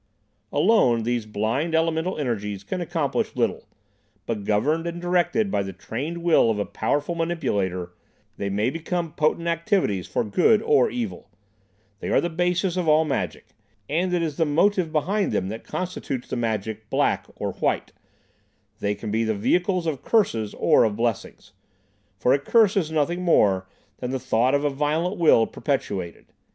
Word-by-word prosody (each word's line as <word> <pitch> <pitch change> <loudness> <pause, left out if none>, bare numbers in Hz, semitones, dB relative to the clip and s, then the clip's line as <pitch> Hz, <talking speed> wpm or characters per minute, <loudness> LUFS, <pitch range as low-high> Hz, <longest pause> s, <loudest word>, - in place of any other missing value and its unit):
"Alone, 120 - +3
these 120 -1 -1
blind 115 +10 -1
elemental 165 +2 0
energies 105 -8 -3
can 180 - -4
accomplish 165 -4 -1
little, - - -1 0.6
but 105 -3 -3
governed 150 +12 +1
and 170 0 -4
directed 175 +4 +1
by - - +1
the 95 0 -5
trained 145 - -5
will 165 -8 +4
of 110 - 0
a 105 - -1
powerful 145 +9 -1
manipulator 105 - -2 0.4
they 100 - -2
may 105 +5 0
become 165 +1 -3
potent 155 +2 0
activities 170 - 0
for - - -1
good 180 - +3
or 450 +1 +4
evil. 240 - -5 0.7
They - - -5
are - - +4
the 175 - -2
basis 180 +2 0
of 180 -3 -1
all 155 +1 +5
magic, 145 - -3 0.4
and 175 +5 0
it 175 -1 +1
is 155 -3 -3
the 165 - +3
motive 170 +3 +2
behind 190 +7 0
them 95 - -1
that 110 +2 -6
constitutes 175 -8 -4
the - - -2
magic 110 -2 -3
'black' - - +1
or - - -3
'white'; - - -1 0.9
they 105 0 -1
can 105 +1 -6
be 110 +2 +1
the 110 -1 0
vehicles 180 - +1
of 150 -5 -2
curses 115 - +1
or - - +4
of 110 -3 +1
blessings, 115 -1 -3 0.6
for 125 - +3
a 140 - +3
curse 215 +7 +3
is 175 -6 +1
nothing 160 +3 0
more 100 - +3 0.3
than 125 - -4
the 130 - -1
thought 125 +3 +2
of 140 - 0
a - - +3
violent 155 +7 -1
will 150 -9 +5
perpetuated. 100 - -3
150 Hz, 165 wpm, -24 LUFS, 110-175 Hz, 0.9 s, all